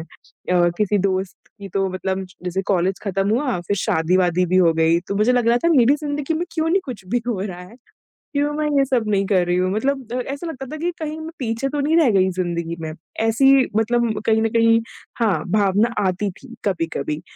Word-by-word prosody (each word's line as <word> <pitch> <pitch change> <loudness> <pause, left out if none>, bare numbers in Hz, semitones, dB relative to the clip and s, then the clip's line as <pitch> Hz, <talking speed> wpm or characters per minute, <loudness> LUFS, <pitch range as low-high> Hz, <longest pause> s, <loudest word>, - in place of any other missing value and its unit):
अ, 175 +1 -2
किसी 210 -1 +2
दोस्त 190 -1 -1 0.2
की 200 - -7
तो 195 -1 +1
मतलब 190 +1 -3 0.2
जैसे 185 +2 -2
कॉलेज 190 0 +1
खत्म 195 0 -1
हुआ, 245 -4 0
फिर 190 +4 -2
शादी-वादी 180 -1 +1
भी 185 +2 +1
हो 170 -3 +5
गई, 165 +1 +3
तो 190 +3 -5
मुझे 215 +5 +3
लग 245 -2 +2
रहा 235 - +4
था - - +5
मेरी 250 +2 +5
ज़िंदगी 295 +1 -3
में 335 - -1
क्यों 320 -1 0
नहीं 380 +4 +3
कुछ 245 -8 -8
भी 240 +4 0
हो 225 - -1
रहा 185 -3 -5
है? 180 +6 -13 0.6
क्यों 290 +1 +1
मैं 305 0 -1
ये 275 - +4
सब 255 -4 0
नहीं 200 -1 +1
कर 190 -3 +2
रही 175 0 +1
हूँ? 185 +1 +1
मतलब 270 +5 0
द 250 - -1
ऐसा 280 +5 -5
लगता 270 -5 -6
था - - -4
कि 345 +3 -1
कहीं 310 -1 -4
मैं 315 - -6
पीछे 230 +1 -2
तो 290 +1 -2
नहीं 300 +3 +2
रह 315 -7 +5
गई 190 -1 +3
ज़िंदगी 170 -2 -2
में। 160 -1 -5 0.3
ऐसी 230 +5 +4 0.2
मतलब 225 -1 +1
कहीं 220 0 +3
न 225 - +2
कहीं 230 0 +5 0.4
हाँ, 190 -9 +2
भावना 210 +3 +2
आती 185 +2 -1
थी 235 +6 -14
कभी-कभी 165 -5 -2
210 Hz, 220 wpm, -21 LUFS, 185-255 Hz, 0.6 s, हो